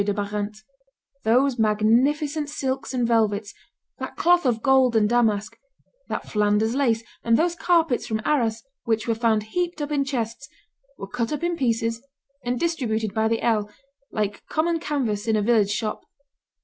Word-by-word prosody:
de 200 0 -1
Barante. 210 +1 -4 0.6
Those 250 +3 +3
magnificent 270 +8 +2
silks 265 -2 -3
and 245 -3 0
velvets, 215 -3 +1 0.5
that - - -6
cloth 350 -3 +3
of 230 -2 0
gold 265 -3 +4
and 215 -1 +4
damask, 215 -3 +1 0.5
that - - -4
Flanders 210 +1 +1
lace, 235 -5 +1 0.2
and 230 0 +3
those 345 +1 +1
carpets 330 -6 +1
from 220 -1 -1
Arras 230 -7 +1 0.2
which 225 -2 -1
were 230 - +2
found 225 -2 +1
heaped 350 -1 -1
up 295 0 -3
in 285 -2 +2
chests, 265 0 -4 0.5
were - - -6
cut 230 +3 -2
in 345 0 0
pieces 230 -4 0 0.4
and 245 0 -1
distributed 225 - -1
by 220 0 +1
the 225 0 -1
ell, 215 -3 +1 0.4
like 210 -1 -2
common 330 +1 0
canvas 235 -9 -2
in 220 - +2
a 210 - +2
village 215 -3 +3
shop. 215 +1 -2
230 Hz, 160 wpm, -24 LUFS, 215-275 Hz, 0.6 s, gold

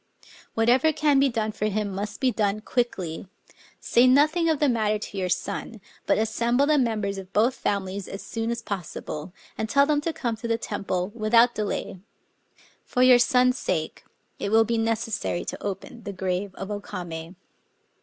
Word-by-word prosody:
Whatever 245 +7 +4
can 295 -2 +3
be 275 0 +4
done 220 -3 -1
for 210 - -3
him 210 0 -1
must 205 +2 -5
be 260 -2 +2
done 210 -2 0
quickly. 195 -9 -2 0.5
Say 240 +2 +4
nothing 305 +6 +4
of 315 - +2
the 295 - +2
matter 215 -4 +1
to 205 -1 -8
your 185 -1 -1
son; 200 +4 -3 0.3
but - - +3
assemble 235 +4 +1
the 300 0 +3
members 215 -5 -1
of 190 0 -11
both 230 +5 +3
families 200 -2 -2
as 195 - -7
soon 225 0 -3
as 235 0 -3
possible, 180 -5 -5 0.3
and 220 - -2
tell 280 +2 +5
them 295 0 +1
to 330 - -1
come 240 -7 -2
to 235 +2 -5
the 230 0 +1
temple 195 -4 -3
without 230 +2 +4
delay. 200 -2 -3 0.8
For 250 - +1
your 255 -1 +7
son's 250 0 +3
sake 160 -4 -2 0.4
it 200 - -2
will 225 +1 +5
be 230 +1 0
necessary 220 - -1
to - - -6
open 200 +4 -5
the 200 - -6
grave 185 +1 -3
of 195 +2 -6
O 205 - -2
Kamc." 170 -3 -7
220 Hz, 180 wpm, -25 LUFS, 200-245 Hz, 0.8 s, your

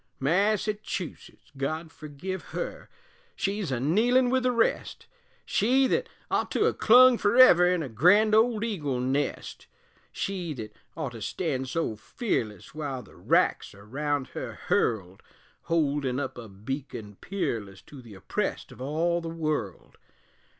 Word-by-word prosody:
Massachusetts, 200 +3 -1
God 155 +4 -3
forgive 155 +6 -6 0.2
her, - - -5 0.5
She's 195 -4 -2
a 130 - -1
kneelin' 240 - +3
with 260 0 +2
the 250 0 +2
rest, 235 -2 0 0.4
She, 260 +6 +3
thet - - 0 0.2
ough' - - +1
to - - +1
ha' - - +2
clung 250 +1 +7
ferever 205 -5 +6
In 180 -3 0
her - - -4
grand 180 - +4
old 220 0 +3
eagle 150 - -2
nest; 135 +3 -2 0.4
She 180 -6 -3
thet 110 -3 -7 0.3
ough' 155 -5 -2
to 115 -2 -10
stand 130 - -2
so 165 -8 -1
fearless 110 - -3
Wile 140 -5 -4
the 100 - -18
wracks - - +1
are 100 0 -15
round 145 +3 -2
her - - -6 0.2
hurled, 95 -5 0 0.4
Holdin' 145 -5 0
up 135 -2 -4
a 115 -3 -9
beacon 105 0 -7
peerless 110 - -4
To 140 -3 -12
the 115 -4 -13
oppressed 95 - -3
of - - -12
all 165 +5 0
the 165 - -5
world! 155 - -4
155 Hz, 145 wpm, -27 LUFS, 125-200 Hz, 0.5 s, clung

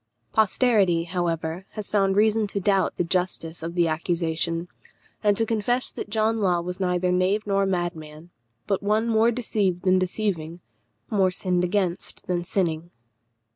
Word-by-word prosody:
Posterity, 210 -5 +3
however, 170 0 -3
has 215 -2 -4
found 195 -2 +2
reason 215 +1 +3
to 200 - -3
doubt 195 0 +1
the - - +1
justice 170 -2 -2
of 165 +1 -5
the 170 -1 +3
accusation, 165 +1 -1 0.6
and 205 -1 +3
to 225 - +2
confess 235 +3 0
that - - -7
John 220 +1 +1
Law 180 -4 +2
was 180 +2 -5
neither 180 -1 +1
knave 185 +4 +1
nor 195 -1 +1
madman, 170 -3 -4 0.3
but 195 -2 0
one 215 +3 +1
more 225 0 +4
deceived 210 -6 -1
than 185 0 +4
deceiving, 180 -3 -2 0.5
more 195 -3 +3
sinned 180 -1 0
against 180 -1 -2
than 175 -1 -1
sinning. 170 -3 -1
185 Hz, 150 wpm, -25 LUFS, 175-210 Hz, 0.6 s, more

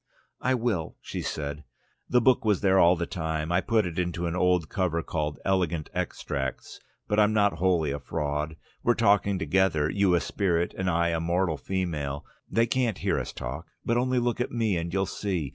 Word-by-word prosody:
"I 130 0 +2
will," 110 -10 -1
she - - -5
said. 75 0 -4 0.5
"The 125 - +4
book 130 +2 +4
was 105 -4 +2
there 95 -1 +4
all 85 +1 +6
the 85 0 -2
time. 80 -3 -3
I 90 +1 +3
put 110 -1 +2
it 85 -1 -3
into 85 -1 -1
an 85 0 -2
old 90 -3 +2
cover 85 -4 -1
called 75 -2 -2
'Elegant 85 -5 0
Extracts...' 65 -2 -4 0.3
But 105 - +1
I'm 105 0 +4
not 100 -6 +2
wholly 85 -5 +2
a 70 - -3
fraud. 75 +3 -3 0.3
We're 120 - +3
talking 100 -3 +3
together, 95 -6 +2
you 100 -3 +3
a - - +3
spirit 85 -4 0
and 95 -1 -1
I 85 0 +2
a 85 -1 0
mortal 85 0 +1
female. 75 -7 -3 0.2
They 115 +1 +3
can't 120 -3 0
hear - - 0
us - - -4
talk. 65 +7 -6 0.2
But 115 - +1
only 130 +1 +1
look 120 -1 0
at 125 - -1
me, 115 -5 +1
and 85 0 -2
you'll 95 +2 +1
see... 90 -8 -2
90 Hz, 195 wpm, -27 LUFS, 80-100 Hz, 0.5 s, all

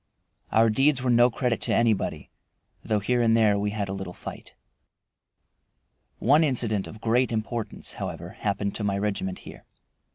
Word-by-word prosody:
Our 110 0 +4
deeds 135 +2 +3
were 125 - +2
no 120 +1 +5
credit 120 0 -1
to - - +1
anybody, 115 -3 0 0.5
though 110 -2 0
here 125 +4 +1
and 115 -1 +4
there 105 -3 +3
we 105 0 0
had 105 -1 -3
a 95 - -4
little 95 -2 -6
fight. - - -10 1.6
One 145 +6 +4
incident 115 -8 0
of 110 - -10
great 120 +2 +2
importance, 110 0 -4
however, - - -5
happened 100 -1 -2
to 110 - -4
my 100 -1 0
regiment 100 -2 -2
here. - - -11
110 Hz, 160 wpm, -26 LUFS, 100-120 Hz, 1.6 s, no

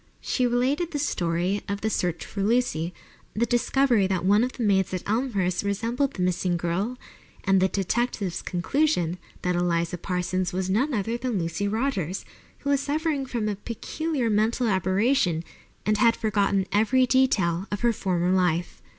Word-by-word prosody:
She 250 -2 0
related 260 +8 +1
the 310 - -3
story 180 - 0
of 200 0 -2
the 220 - 0
search 175 -4 -1
for 200 - -5
Lucy, 200 -7 +1 0.4
the 230 +3 +2
discovery 240 -2 +2
that 185 -2 -1
one 205 +4 +5
of 255 - -2
the 245 - -4
maids 190 -3 +2
at 185 - -6
Elmhurst 205 -6 0
resembled 230 +7 -1
the 180 - -1
missing 180 -1 0
girl, 185 +9 -2 0.5
and 195 -1 +3
the 190 - +4
detective's 200 -1 -1
conclusion 180 - 0 0.2
that 180 0 +1
Eliza 170 0 0
Parsons 180 0 -1
was 190 0 -1
none 255 +7 +1
other 225 +3 -1
than 245 -4 -1
Lucy 170 +3 -1
Rogers, 200 - -1 0.4
who 280 - -1
was 280 - +3
suffering 290 -1 -1
from 235 -4 -2
a 210 - -1
peculiar 265 +5 -3
mental 225 +3 +1
aberration 190 - +2 0.4
and 215 0 +2
had 230 +1 +5
forgotten 200 -3 +1
every 225 +5 +3
detail 210 -9 +2
of 205 - -3
her 240 -1 +3
former 180 -3 0
life. 180 -2 0
205 Hz, 165 wpm, -25 LUFS, 180-245 Hz, 0.5 s, one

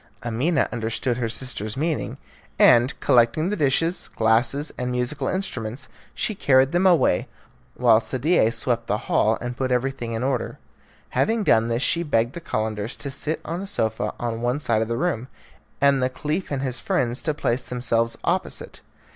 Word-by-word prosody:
Amina 130 +6 +1
understood 115 +1 -1
her 120 -2 -1
sister's 115 -1 -2
meaning, 155 +1 -2 0.4
and 120 +3 +5
collecting 120 +8 +3
the - - 0
dishes, 165 +2 +1
glasses, 120 +6 +1
and 125 -1 -3
musical 125 +3 -2
instruments, 130 - -3 0.3
she 220 - -1
carried 135 -7 +3
them 180 +2 +3
away, 160 - +3 0.5
while 115 -3 +5
Sadie 130 +1 +1
swept 115 0 -2
the 105 - +1
hall 110 +1 +2
and 120 0 -4
put 130 0 -2
everything 125 -2 -1
in 115 +2 -2
order. 130 -3 -2 0.5
Having 225 0 +1
done 115 - +4
this 120 +3 0
she 170 - +2
begged 120 -6 0
the 170 - -7
Calenders 110 -5 -3
to 140 - -4
sit 155 +3 -2
on 170 +3 -4
a 200 - -6
sofa 110 - -1
on 115 -1 -3
one 125 +4 0
side 115 -6 +1
of 110 - -1
the 115 0 -2
room, 130 -6 -1 0.5
and 140 -1 +4
the 130 - +2
Caliph 150 +7 -3
and 140 -2 -2
his 130 -2 -2
friends 125 0 0
to 155 -2 -1
place 125 -4 0
themselves 115 -2 -1
opposite. - - -2
125 Hz, 170 wpm, -23 LUFS, 115-145 Hz, 0.5 s, and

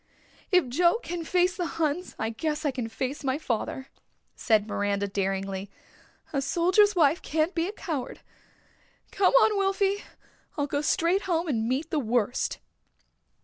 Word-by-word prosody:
If 365 -7 +4
Joe 340 - +3
can 345 0 -4
face 360 +2 +2
the 355 -2 -2
Huns 325 +3 -1
I 225 0 -2
guess 300 +6 -3
I 290 - +2
can 250 -3 -4
face 265 +5 -4 0.2
father," 260 0 -3 0.5
said 215 -3 +2
Miranda 200 -1 -1
daringly. 195 0 -2 0.6
"A 275 - +1
soldier's 365 +8 +3
wife 320 -1 +3
can't 315 +4 0
be 335 +1 0
a - - -3
coward. 315 - -5 0.9
Come 390 +2 +3
on, 435 -3 +5
Wilfy. 390 +1 +1 0.6
I'll 290 - +1
go 285 0 -1
straight 335 +5 +2
home 340 0 +1
and 230 -6 0
meet 280 +6 -2
the 310 - +1
worst." 240 -1 0
300 Hz, 145 wpm, -27 LUFS, 240-355 Hz, 0.9 s, on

